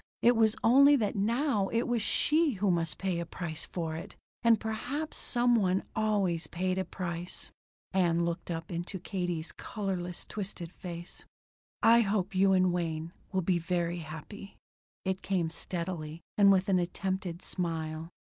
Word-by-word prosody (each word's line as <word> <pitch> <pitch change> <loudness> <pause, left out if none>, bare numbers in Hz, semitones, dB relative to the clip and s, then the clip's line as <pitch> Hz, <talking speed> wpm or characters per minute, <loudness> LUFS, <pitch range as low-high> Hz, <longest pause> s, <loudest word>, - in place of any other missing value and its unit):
It 240 +1 +6
was 220 -1 +4
only 280 +5 +7
that 215 -7 0
now 220 +1 +1
it 230 +3 +1
was 240 -2 0
she 305 +7 +3
who 200 -1 +1
must 165 -3 0
pay 185 -3 -1
a 170 - -3
price 165 -3 -5
for 165 -3 -3
it. 160 - -8 0.3
And 230 -2 +5
perhaps 260 +8 -3
some 240 -1 +3
one 190 -3 +2
always 195 -7 +1
paid 185 +3 -1
a 190 - -1
price. 175 -1 -5 0.4
"Ann?" 175 -3 +3
Ann - - +2
looked 170 +1 -3
up 165 0 -4
into 175 +3 -4
Katie's 175 -3 -2
colorless, 185 -4 -4
twitching 190 -4 -5
face. 175 -1 -7 0.6
"I 230 +1 +7
hope 200 -2 0
you 190 +1 +4
and 185 -1 +4
Wayne 165 -1 -2 0.2
will 190 -1 0
be 175 0 +2
very 175 0 -1
happy." 160 +6 -9 0.5
It 190 0 -1
came 180 -4 0
steadily, 170 -2 -4
and 200 -1 +7
with 190 -1 +3
an 190 -2 +3
attempted 180 0 -3
smile. 160 -2 -3
185 Hz, 160 wpm, -30 LUFS, 170-210 Hz, 0.6 s, only